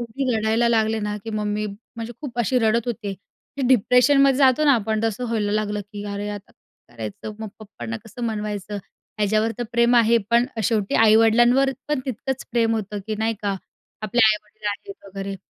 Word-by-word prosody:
एवढी 240 +1 -2
रडायला 220 +2 +2
लागले 225 -1 +2
ना, 210 0 -2
की 225 - -5
मग 215 -1 -2
मी 210 +1 -1
म्हणजे 225 +3 -9
खूप 265 -6 -7
अशी 240 +2 +2
रडत 225 0 +1
होते, 230 -4 -3
की 200 +7 -11
डिप्रेशनमध्ये 260 +3 +5
जातो 270 +1 +4
ना 290 - +6
आपण 220 -1 0
तसं 225 +2 -1
व्हायला 215 -3 -1
लागलं, 210 -1 -1
की 205 0 -9
अरे 205 +1 -4
आता 205 -1 -8 0.4
करायचं. 115 - -7
मग 220 - -4
पप्पांना 120 - -7
कसं 230 +3 -10
मनवायचं? 210 -2 -4 0.4
ह्याच्यावर 215 +2 +1
तर - - -1
प्रेम 235 +1 +4
आहे 235 0 +5
पण 235 +1 +5 0.2
शेवटी 210 -1 0
आई-वडिलांवर 225 +4 +5 0.2
पण 300 -3 0
तितकंच 260 +2 -3
प्रेम 230 -1 +2
होतं, 210 -1 -3
की 215 - -2
नाही 225 +1 0
का? 200 -1 0 0.5
आपले 215 +3 +1
आई-वडील 210 0 -3
आहेत 200 -1 -6
वगैरे. 195 0 -5
220 Hz, 180 wpm, -23 LUFS, 210-240 Hz, 0.5 s, ना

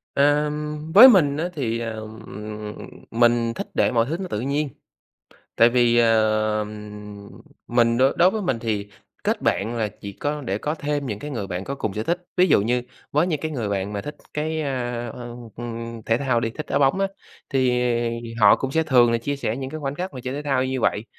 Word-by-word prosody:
Ờm, 150 +1 +1
với 225 +8 +11
mình 155 - +5
á, 165 +4 -1
thì, 120 -8 -2
ờm, 110 -1 -6 0.9
mình 120 0 +2
thích - - -4
để - - +3
mọi 115 -1 +2
thứ 155 +5 -2
nó 190 - -4
tự 105 - -2
nhiên. 140 +4 -1 0.9
Tại 115 - +6
vì, 120 -1 +3
ờ, 110 -2 +3 1.0
mình 115 -1 +3 0.2
đối 180 +2 +5
với 215 +1 -2
mình 155 - -1
thì 105 -3 -2 0.3
kết - - 0
bạn 110 +4 0
là 110 -2 0
chỉ 100 - -6
có 145 +6 -3
để 100 -7 -2
có 150 +8 -2
thêm 145 -2 -2
những 105 -3 -4
cái 150 - -6
người 110 -7 -4
bạn 90 0 -4
có 140 - -4
cùng 110 -7 -3
sở 110 - -3
thích. 175 +7 -1 0.2
Ví 180 +1 +5
dụ - - +4
như 120 +4 +1 0.3
với 150 +4 +2
những 155 -5 -1
cái 155 - -3
người 120 -8 -3
bạn 100 0 -2
mà 100 - -3
thích 150 +6 -7 0.2
cái, 155 +1 -2
à, 120 -4 -3 0.5
ưm, 115 -1 -6
thể 115 - +2
thao 125 -3 +1
đi, 115 - -1
thích 150 +7 -7
đá - - +1
bóng 140 +6 +3
á, 195 - +2 0.4
thì 130 -2 +2 0.6
họ 100 -2 +7
cũng 135 - -4
sẽ 160 +3 +2
thường 125 -6 +4
là 115 - +2
chia 140 +5 -3
sẻ 115 -5 -2
những 135 -1 -5
cái 155 - -6
khoảnh 140 -1 -3
khắc 180 +2 -4
mà 130 - -6
chơi 130 - -3
thể 145 - -3
thao 135 -3 +1
như 130 -1 -2
vậy, 105 0 +1
125 Hz, 215 wpm, -23 LUFS, 115-150 Hz, 1.0 s, với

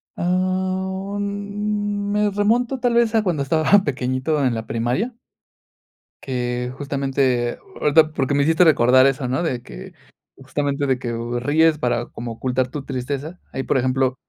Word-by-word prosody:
Ah, 185 +2 -1
mm, 205 0 -2
me 210 0 +2
remonto 235 +6 +1
tal 245 -1 +1
vez 235 -1 +3
a 220 - +3
cuando 170 -8 0
estaba 160 +8 +3
pequeñito 130 +1 -1
en 125 -2 +1
la 110 0 -4
primaria. 125 - -2 1.1
Que 125 -1 -2
justamente 135 -3 -1 0.2
ahorita 155 +1 +4
porque 140 -2 -1
me 140 0 +3
hiciste 160 +4 +4
recordar 130 -5 +5
eso, 135 -1 +1
¿no?, 130 +7 -1
de 130 -7 -2
que - - -11 0.4
justamente 145 0 -2
de 130 -1 +1
que, 120 - -4
eh, 120 +1 -3
ríes 155 +5 +3
para 120 -3 -1
como 120 0 -7
ocultar 125 +2 -1
tu 145 +1 -6
tristeza, 140 +6 -4
ahí, 135 - -3
por - - +1
ejemplo, 130 0 +1
145 Hz, 155 wpm, -21 LUFS, 130-190 Hz, 1.1 s, recordar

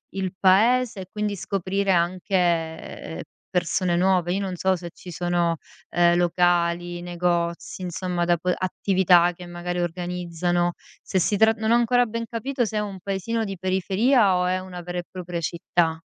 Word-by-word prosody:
il 190 -2 -2
paese 220 +3 +4
e 185 - -9
quindi 210 -1 -2
scoprire 195 +1 -1
anche 170 -2 -1 0.3
persone 175 0 +1
nuove. 180 -1 +2
Io 195 - -1
non 190 -2 -3
so 190 +2 +2
se 175 -1 -7
ci 180 - -11
sono, 175 -1 0 0.4
ehm, 175 0 +4
locali, 175 0 +1
negozi, 175 0 -2
insomma 180 0 -2
da 175 0 +3
po 180 +2 -1
attività 185 -2 +3
che 175 +1 -11
magari 175 0 -4
organizzano, 175 0 -1 0.3
se 190 - -1
si 205 +4 +1
trat 220 +2 +5
non 220 0 0
ho - - +6
ancora 245 +1 +3
ben 230 0 -4
capito 245 +2 -1
se 220 - -5
è - - +2
un 195 -2 -5
paesino 200 +4 -2
di 195 -1 -5
periferia 190 +4 +2
o 180 0 +1
è 185 +1 +1
una 185 -1 -8
vera 175 +1 -6
e 175 - -2
propria 175 -2 -5
città. 165 0 0
180 Hz, 170 wpm, -24 LUFS, 175-195 Hz, 0.4 s, ho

